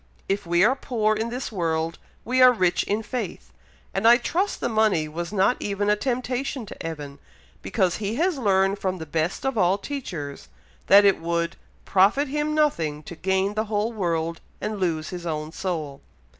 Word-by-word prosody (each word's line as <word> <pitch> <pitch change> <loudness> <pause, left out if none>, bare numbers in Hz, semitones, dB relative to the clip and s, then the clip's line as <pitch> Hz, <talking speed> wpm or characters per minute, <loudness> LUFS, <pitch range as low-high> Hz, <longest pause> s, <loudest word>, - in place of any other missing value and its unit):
If 195 -1 -1
we 175 +1 +3
are 250 +5 +4
poor 220 -5 0
in 220 +2 -2
this 245 +1 -4
world, 165 -4 -1 0.3
we 255 +3 +2
are 255 0 +9
rich 185 -7 +2
in 215 +2 -1
faith; 245 +3 -5 0.4
and 195 +4 +2
I 240 +1 +8
trust 350 +11 -1
the - - -1
money 215 -8 +2
was 170 +3 -5
not 210 +4 +2
even 205 0 0
a - - +4
temptation 255 +2 -2
to - - -9
Evan, 150 -4 -6 0.4
because 185 -5 0
he 210 +1 -3
has 335 +1 +1
learned 195 -3 +2
from 185 -1 -1
the 160 - -6
best 160 - -2
of 265 -5 0
all 185 +1 +3
teachers, 170 - -6 0.4
that 200 +1 +8
it 200 - +4
would 170 0 -1 0.3
'profit 205 +10 +3
him 300 +2 -1
nothing 160 - +1
to 170 - -9
gain 190 +3 0
the 215 +1 -1
whole 215 +2 -1
world, 165 -5 -2 0.2
and 215 -1 -3
lose 160 -4 -1
his 175 -2 -6
own 155 -1 -3
soul.'" 160 -7 -4
195 Hz, 185 wpm, -24 LUFS, 170-235 Hz, 0.4 s, are